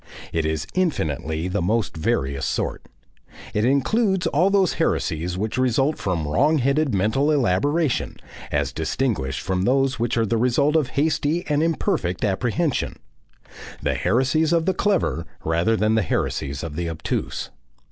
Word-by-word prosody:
It 80 Hz, -2 st, 0 dB
is 80 Hz, -1 st, -2 dB
infinitely 80 Hz, -, -1 dB
the 95 Hz, +2 st, -1 dB
most 110 Hz, +5 st, 0 dB
various 70 Hz, -3 st, -1 dB
sort. -, -, -2 dB, 0.7 s
It 105 Hz, +1 st, +1 dB
includes 190 Hz, -, +2 dB
all 175 Hz, +7 st, +3 dB
those 195 Hz, -3 st, +3 dB
heresies 85 Hz, +3 st, 0 dB
which 110 Hz, +5 st, -2 dB
result 130 Hz, +4 st, +1 dB
from 85 Hz, -6 st, -1 dB
wrong 145 Hz, -, +3 dB
headed 140 Hz, +2 st, +1 dB
mental 110 Hz, +9 st, +1 dB
elaboration, 145 Hz, -, +1 dB, 0.3 s
as 70 Hz, -3 st, 0 dB
distinguished 80 Hz, -, -1 dB
from 90 Hz, 0 st, -1 dB
those 130 Hz, +3 st, +1 dB
which 120 Hz, 0 st, 0 dB
are 115 Hz, -, +3 dB
the 115 Hz, +2 st, 0 dB
result 125 Hz, +6 st, +2 dB
of 155 Hz, -5 st, +3 dB
hasty 155 Hz, +3 st, +1 dB
and 150 Hz, 0 st, +1 dB
imperfect 130 Hz, -, 0 dB
apprehension, 120 Hz, -, -1 dB, 0.9 s
the -, -, +1 dB
heresies 135 Hz, -, +1 dB
of 165 Hz, -1 st, +2 dB
the 190 Hz, -, +2 dB
clever 185 Hz, -, 0 dB, 0.2 s
rather 85 Hz, +8 st, +2 dB
than 110 Hz, +1 st, +2 dB
the 110 Hz, -, +3 dB
heresies 70 Hz, -7 st, -2 dB
of 80 Hz, -3 st, -5 dB
the 85 Hz, 0 st, -2 dB
obtuse. 80 Hz, -1 st, -3 dB
115 Hz, 145 wpm, -23 LUFS, -, 0.9 s, all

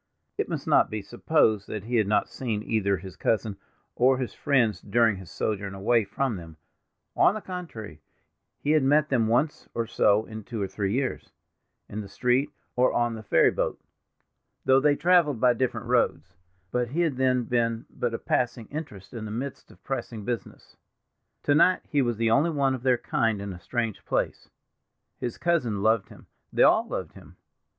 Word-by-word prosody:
It -, -, -2 dB
must -, -, -3 dB
not -, -, +4 dB
be 110 Hz, -2 st, -4 dB
supposed 110 Hz, -3 st, +1 dB
that 105 Hz, -3 st, -5 dB
he 120 Hz, +2 st, -1 dB
had 110 Hz, -3 st, +2 dB
not 105 Hz, 0 st, +2 dB
seen 110 Hz, -5 st, -3 dB
either 100 Hz, -4 st, +1 dB
his 90 Hz, 0 st, -10 dB
cousin 110 Hz, +5 st, 0 dB, 0.4 s
or 130 Hz, +2 st, +4 dB
his 125 Hz, -2 st, -3 dB
friends 120 Hz, -7 st, +1 dB
during 115 Hz, 0 st, +2 dB
his 95 Hz, -2 st, -11 dB
sojourn 100 Hz, -2 st, -3 dB
away 110 Hz, +3 st, +2 dB
from 115 Hz, +2 st, -2 dB
them; 80 Hz, -2 st, -11 dB, 0.6 s
on 200 Hz, -, +4 dB
the -, -, -3 dB
contrary, 160 Hz, -, -8 dB, 0.6 s
he 145 Hz, -, -1 dB
had 155 Hz, -1 st, +4 dB
met 150 Hz, +3 st, +3 dB
them 120 Hz, -5 st, +2 dB
once 125 Hz, +7 st, 0 dB
or 115 Hz, -, 0 dB
so 105 Hz, -1 st, +2 dB
in 110 Hz, 0 st, -8 dB
two 115 Hz, +1 st, -6 dB
or 100 Hz, -, -1 dB
three 100 Hz, 0 st, -2 dB
years, 130 Hz, +3 st, -2 dB, 0.6 s
in 110 Hz, -, -5 dB
the 100 Hz, -, -8 dB
street, 125 Hz, +7 st, +1 dB, 0.3 s
or 125 Hz, +1 st, +3 dB
on 120 Hz, -1 st, +1 dB
the 110 Hz, -, -7 dB
ferry 110 Hz, -, +4 dB
boat—though 130 Hz, 0 st, -3 dB
they 145 Hz, +1 st, +3 dB
traveled 165 Hz, -6 st, +3 dB
by 125 Hz, +1 st, +5 dB
different 125 Hz, +1 st, -2 dB
roads—but 90 Hz, +7 st, -2 dB
he 150 Hz, +9 st, -1 dB
had 155 Hz, -7 st, 0 dB
then 130 Hz, -1 st, +2 dB
been 115 Hz, -1 st, 0 dB
but 120 Hz, -2 st, -2 dB
a -, -, -2 dB
passing 120 Hz, -1 st, -1 dB
interest 140 Hz, -, -7 dB
in 115 Hz, -3 st, -5 dB
the -, -, -6 dB
midst 130 Hz, +6 st, -5 dB
of -, -, -19 dB
pressing 115 Hz, -5 st, -4 dB
business. 120 Hz, 0 st, -6 dB, 0.7 s
To 145 Hz, -, +3 dB
night 175 Hz, +5 st, +4 dB
he 145 Hz, -, +1 dB
was 120 Hz, -4 st, 0 dB
the 115 Hz, 0 st, +1 dB
only 140 Hz, +8 st, +4 dB
one 140 Hz, -4 st, +1 dB
of 130 Hz, -, -4 dB
their 125 Hz, -1 st, +3 dB
kind 115 Hz, -2 st, 0 dB
in 100 Hz, -1 st, -5 dB
a 90 Hz, -, -10 dB
strange 115 Hz, +1 st, -3 dB
place—his 120 Hz, -, -6 dB
cousin 125 Hz, -13 st, 0 dB
loved 110 Hz, -1 st, +2 dB
him, -, -, -15 dB, 0.3 s
they -, -, +3 dB
all -, -, +5 dB
loved -, -, -5 dB
him. -, -, -15 dB
115 Hz, 185 wpm, -26 LUFS, 105-135 Hz, 0.7 s, by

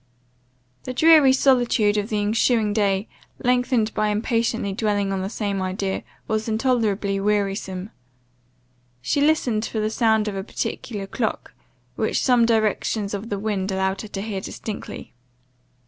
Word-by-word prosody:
The 255 Hz, -, -5 dB
dreary 315 Hz, -2 st, +7 dB
solitude 245 Hz, -6 st, +3 dB
of 210 Hz, +1 st, -1 dB
the 215 Hz, -, -1 dB
ensuing 215 Hz, +1 st, +2 dB
day, 200 Hz, -1 st, +1 dB, 0.4 s
lengthened 245 Hz, -3 st, +2 dB
by 215 Hz, -, +1 dB
impatiently 225 Hz, 0 st, 0 dB
dwelling 205 Hz, -1 st, 0 dB
on 190 Hz, -, -2 dB
the 190 Hz, -, -3 dB
same 200 Hz, -3 st, -2 dB
idea, 190 Hz, +1 st, -2 dB, 0.3 s
was 220 Hz, 0 st, -1 dB
intolerably 220 Hz, -4 st, 0 dB
wearisome. 195 Hz, -1 st, -1 dB, 1.1 s
She 285 Hz, -, +1 dB
listened 265 Hz, -8 st, +2 dB
for 220 Hz, -, -3 dB
the 215 Hz, 0 st, 0 dB
sound 220 Hz, -2 st, +2 dB
of 205 Hz, -, -3 dB
a 195 Hz, -, -3 dB
particular 205 Hz, 0 st, -4 dB
clock, 220 Hz, +3 st, -3 dB, 0.4 s
which -, -, 0 dB
some 245 Hz, -3 st, +4 dB
directions 215 Hz, -2 st, 0 dB
of 205 Hz, +3 st, -5 dB
the 205 Hz, -, -2 dB
wind 200 Hz, -2 st, -2 dB
allowed 190 Hz, 0 st, -1 dB
her 215 Hz, -, -8 dB
to 195 Hz, -1 st, -5 dB
hear 205 Hz, -3 st, -4 dB
distinctly. 210 Hz, +2 st, -7 dB
215 Hz, 145 wpm, -23 LUFS, 200-230 Hz, 1.1 s, dreary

